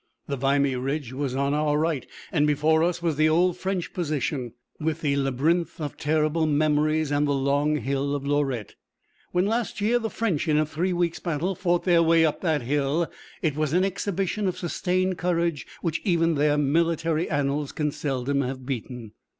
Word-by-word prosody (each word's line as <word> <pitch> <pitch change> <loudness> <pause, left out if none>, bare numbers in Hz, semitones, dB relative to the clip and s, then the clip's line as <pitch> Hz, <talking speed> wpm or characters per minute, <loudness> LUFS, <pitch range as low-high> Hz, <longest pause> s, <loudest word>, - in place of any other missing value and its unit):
The 140 - -3
Vimy 140 0 +2
Ridge 135 0 -3
was 135 -1 -2
on 140 +1 +1
our 150 0 +1
right, 155 -4 -1 0.2
and 150 -3 +2
before 155 +2 +3
us 170 0 0
was 165 -4 0
the 155 +1 +4
old 175 +2 +3
French 185 -1 -3
position, 145 - -2 0.3
with 160 +1 -2
the 140 -2 +1
labyrinth 145 +6 0
of 150 -3 -4
terrible 155 +1 +1
memories 155 0 +2
and 145 0 +2
the 145 - +1
long 140 +2 +1
hill 140 0 -1
of 140 -1 -4
Lorette. 140 -6 -1 0.6
When, 180 +1 +2
last 225 +1 -1
year, 225 +4 +2
the 225 -1 -3
French, 200 -12 -1
in 150 -1 +3
a 155 - +3
three 165 +5 -1
weeks' 175 -1 0
battle, 170 +2 -1
fought 175 -2 0
their 175 -2 +4
way 165 0 +5
up 155 - -1
that 155 -7 0
hill, 145 +5 0 0.3
it 155 -4 +1
was 155 -1 -1
an 180 +2 +3
exhibition 195 +1 -1
of 180 - -2
sustained 185 +1 -1
courage 170 -3 0 0.2
which 165 -2 -1
even 170 -3 +2
their 150 0 +2
military 165 +2 +1
annals 145 -1 -1
can 150 -1 -1
seldom 140 -1 -1
have 130 0 -4
beaten. 125 -3 -5
155 Hz, 185 wpm, -25 LUFS, 140-170 Hz, 0.6 s, way